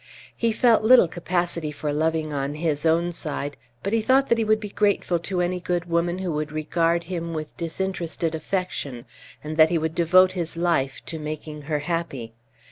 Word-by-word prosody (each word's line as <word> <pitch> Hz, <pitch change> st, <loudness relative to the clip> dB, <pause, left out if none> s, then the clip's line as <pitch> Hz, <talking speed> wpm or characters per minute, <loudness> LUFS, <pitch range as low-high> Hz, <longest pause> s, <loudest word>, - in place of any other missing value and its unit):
He 230 Hz, -1 st, +1 dB
felt 230 Hz, 0 st, +4 dB
little 235 Hz, -3 st, +7 dB
capacity 175 Hz, -2 st, -2 dB
for 150 Hz, 0 st, -3 dB
loving 155 Hz, 0 st, 0 dB
on 140 Hz, +1 st, -2 dB
his 155 Hz, -1 st, 0 dB
own 170 Hz, +2 st, +2 dB
side, 145 Hz, -3 st, -4 dB, 0.3 s
but 200 Hz, -, -2 dB
he 225 Hz, -, +3 dB
thought 265 Hz, +4 st, +3 dB
that 235 Hz, -, +3 dB
he -, -, +2 dB
would 215 Hz, 0 st, +3 dB
be 210 Hz, -1 st, -6 dB
grateful 200 Hz, -4 st, +1 dB
to 180 Hz, +1 st, -2 dB
any 180 Hz, +1 st, 0 dB
good 175 Hz, -1 st, -1 dB
woman 170 Hz, +1 st, 0 dB
who 185 Hz, -2 st, -2 dB
would 150 Hz, -1 st, -2 dB
regard 165 Hz, +2 st, +1 dB
him 170 Hz, -1 st, -4 dB
with 155 Hz, -1 st, -5 dB
disinterested 170 Hz, -1 st, -3 dB
affection, 160 Hz, -7 st, -3 dB, 0.4 s
and 155 Hz, +1 st, -5 dB
that 160 Hz, 0 st, +7 dB
he 175 Hz, -, +1 dB
would 160 Hz, 0 st, -1 dB
devote 185 Hz, +2 st, +5 dB
his 170 Hz, -3 st, -4 dB
life 165 Hz, -6 st, 0 dB
to 160 Hz, -, -5 dB
making 150 Hz, 0 st, -6 dB
her 150 Hz, -, +1 dB
happy. 150 Hz, -9 st, -3 dB
170 Hz, 190 wpm, -24 LUFS, 155-185 Hz, 0.4 s, little